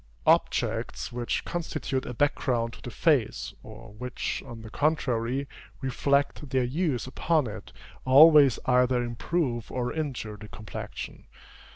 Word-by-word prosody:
Objects - - +1
which 120 0 -2
constitute 155 -6 -3
a 125 - -4
background 120 -4 0
to - - -12
the - - -7
face, 135 -2 +1
or 110 0 -12
which, 125 +3 -4
on 115 -3 -9
the 110 - -10
contrary, 135 -3 0 0.3
reflect 140 +2 0
their 130 -1 +1
hues 140 -1 -1
upon 155 +3 +1
it, 110 -2 -8 0.3
always 145 0 +7
either 125 -1 +3
improve 120 0 -2
or 125 -1 -2
injure 130 -9 -4
the 105 - -10
complexion. 105 -1 -8
125 Hz, 130 wpm, -27 LUFS, 115-145 Hz, 0.3 s, always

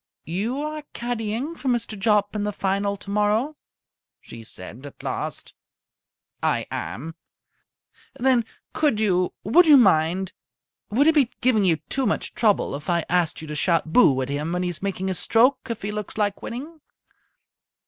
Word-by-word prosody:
"You 210 - -2
are 305 0 -4
caddying 240 +5 -3
for 285 - -7
Mr. 235 -3 0
Jopp 210 0 +1
in 210 - -1
the 210 - -1
Final 200 0 -1
tomorrow?" 210 +9 0 0.6
she 115 -1 -11
said 110 +4 -9
at 140 - -13
last. - - -4 0.9
"I - - +1
am." 160 +7 -5 1.1
"Then 250 -2 +3 0.3
could 290 -9 +1
you 185 -4 +2
would 335 - +5
you 295 -2 +9
mind 185 -4 +3 0.6
would 255 +8 +3
it 320 - +5
be 280 -6 +3
giving 235 -6 +3
you 170 -3 +4
too 270 -2 0
much - - -1
trouble 215 -4 +2
if 145 +5 -6
I 170 -1 +1
asked 175 -3 0
you - - -8
to - - -4
shout 165 +1 +1
'Boo!' 145 - +5
at 130 - -6
him 150 +4 -2
when 180 +1 -1
he 180 - -1
is 175 - -6
making 190 -1 -2
his 185 -3 -1
stroke, 255 +4 +3
if 230 -4 -4
he 205 - -2
looks 210 0 -5
like 205 -2 0
winning?" 300 +7 -7
210 Hz, 170 wpm, -24 LUFS, 180-245 Hz, 1.1 s, you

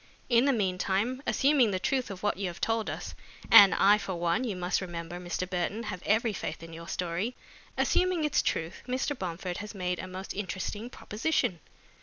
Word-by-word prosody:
In 240 +1 +5
the 280 - +4
meantime, 200 +3 0
assuming 275 -4 +4
the 190 - 0
truth 255 +7 -1
of 195 -1 -8
what 205 -3 +1
you 195 -1 -2
have 175 - -7
told 225 -1 0
us - - -5 0.4
and 200 -1 +10
I 205 +2 +5
for 190 -3 -4
one, 170 +6 0
you 220 -6 -2
must 180 +1 0
remember, 175 -1 -6
Mr. 180 +1 -3
Burton, 185 +5 -2
have 195 -5 -5
every 220 +1 +2
faith 165 -3 -5
in 165 0 -10
your 165 +1 -9
story 180 +7 -2 0.4
assuming 365 -3 +2
its 300 - +2
truth, 165 +2 -2
Mr. 255 +3 -1
Bomford 180 -3 -4
has 210 +1 -7
made 180 -2 -2
a 185 - -5
most 185 +1 -6
interesting 205 +3 -4
proposition." 215 - -1
195 Hz, 190 wpm, -29 LUFS, 180-230 Hz, 0.4 s, and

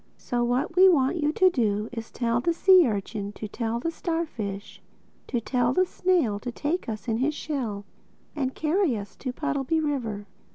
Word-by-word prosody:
So 240 -1 -2
what 250 +7 0
we 375 +1 +8
want 280 -1 +3
you 300 -2 +1
to 375 -1 +4
do 215 - 0
is 230 -2 -6
to - - -32
tell 235 -1 +1
the 340 +6 +1
sea 365 -1 +6
urchin 205 -1 -3
to 215 - -6
tell 230 +2 -2
the 330 +7 -2
starfish 245 - -4 0.5
to 240 - -1
tell 245 +1 0
the 370 +6 +3
snail 345 - +1
to 245 +3 -5
take 300 +4 -2
us 215 +2 -6
in 225 -1 0
his 285 +5 0
shell 235 -11 -4 0.5
and 265 -3 -2
carry 315 - +1
us 200 -1 -8
to 255 - -4
Puddleby 295 +2 -1
River. 240 -9 -2
255 Hz, 190 wpm, -26 LUFS, 225-320 Hz, 0.5 s, we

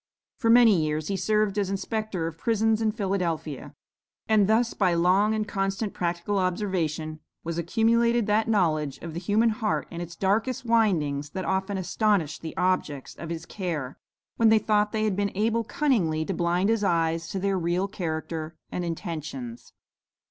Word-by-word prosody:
For 230 - +1
many 225 -8 +6
years 155 +1 -2
he 200 - 0
served 210 +2 +1
as 195 -2 0
inspector 195 -2 -2
of 165 0 -6
prisons 225 -1 +1
in 220 -1 +2
Philadelphia, 180 - -3 0.5
and 215 -2 +4
thus, 230 +2 +3
by 185 -4 +2
long 190 +5 +3
and 215 -1 -2
constant 195 0 -2
practical 175 +3 -1
observation, 175 -5 -1 0.2
was 170 0 -3
accumulated 230 +5 +2
that 215 +2 +2
knowledge 155 -10 +1
of 165 -2 -6
the 170 - -3
human 210 +6 +2
heart 215 -1 -1
in 170 -1 -5
its 175 0 -7
darkest 220 +6 0
windings, 165 -12 +1
that 185 +4 -5
often 190 +1 -1
astonished 185 -4 0
the 160 - -7
objects 170 -7 -1
of 165 - -8
his 165 -1 -5
care, 160 -9 -4 0.4
when 225 -1 +5
they 220 - +6
thought 210 -1 +1
they 220 -1 -1
had 210 -3 +1
been 200 +1 0
able 225 +2 +1
cunningly 185 - +1
to 195 - -2
blind 175 +3 +1
his 225 -2 +1
eyes 165 -2 +1
to 195 - -4
their 195 0 0
real 175 +3 0
character 160 -3 -4 0.2
and 180 - -3
intentions. 155 - -6
190 Hz, 170 wpm, -26 LUFS, 165-215 Hz, 0.5 s, many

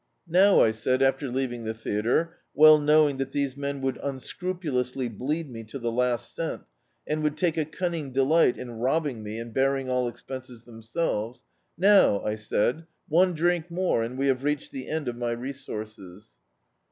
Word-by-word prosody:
"Now," 190 +4 +5
I 110 - +4
said, 130 +4 0
after 135 +1 +1
leaving 120 -2 -2
the 110 0 -3
theatre, 115 +9 0 0.2
well 155 0 +8
knowing 150 -1 +4
that 135 0 -4
these 140 -2 -1
men 140 -1 -4
would 135 -1 -2
unscrupulously 135 -3 -3
bleed 145 +9 -3
me 115 -3 -8
to 110 +6 -7
the 120 -2 -2
last 125 -1 -1
cent, - - -4 0.4
and 155 +1 -2
would 150 0 -1
take 170 0 +1
a 160 -2 0
cunning 160 -3 -3
delight 135 +2 +3
in 120 -3 -8
robbing 135 -1 0
me 105 +1 -6
and 115 0 -7
bearing 135 0 +1
all 125 -1 +1
expenses 125 -1 -8
themselves 115 0 -3 0.2
— - - -48
"now," 195 - +6
I 105 - -1
said, 110 +8 -1 0.2
"<me 180 +3 +4
drink 175 +1 0
more, 175 -7 0
and 120 +3 -4
we 135 - 0
have 135 -1 +1
reached 145 0 -1
the 130 -1 -7
end 155 -3 -3
of 120 -1 -3
my 120 -1 -1
resources." 110 -7 -8
135 Hz, 175 wpm, -26 LUFS, 120-155 Hz, 0.4 s, well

